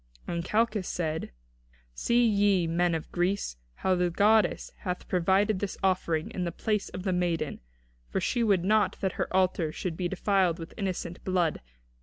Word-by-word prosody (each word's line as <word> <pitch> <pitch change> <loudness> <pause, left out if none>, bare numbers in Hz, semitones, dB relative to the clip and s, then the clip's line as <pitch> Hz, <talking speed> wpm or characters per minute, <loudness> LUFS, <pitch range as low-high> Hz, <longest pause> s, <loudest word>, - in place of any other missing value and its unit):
And 170 -1 -2
Calchas 215 0 +1
said: 160 -2 -2 0.6
"See 235 - +2
ye 200 -4 +3
this, 165 - -2
men 175 -1 +2
of 160 - -5
Greece, 175 - -1 0.2
how 190 - +1
the 180 -1 +2
goddess 205 +2 +3
hath 180 -1 -4
provided 190 +3 +2
this 200 -1 -3
offering 170 -4 +1
in 185 - -3
the 170 - -2
place 210 +3 -1
of 185 - -7
the 190 - 0
maiden, 170 -4 -1 0.5
for - - -1
she 240 -2 0
would 200 -6 +3
not 210 -1 +3
that 190 - +1
her - - -3
altar 185 -4 +1
should 170 +1 -4
be 180 +1 -1
defiled 190 -2 +1
with 165 0 -8
innocent 185 -3 -4
blood. 180 -4 0
185 Hz, 175 wpm, -28 LUFS, 170-200 Hz, 0.6 s, ye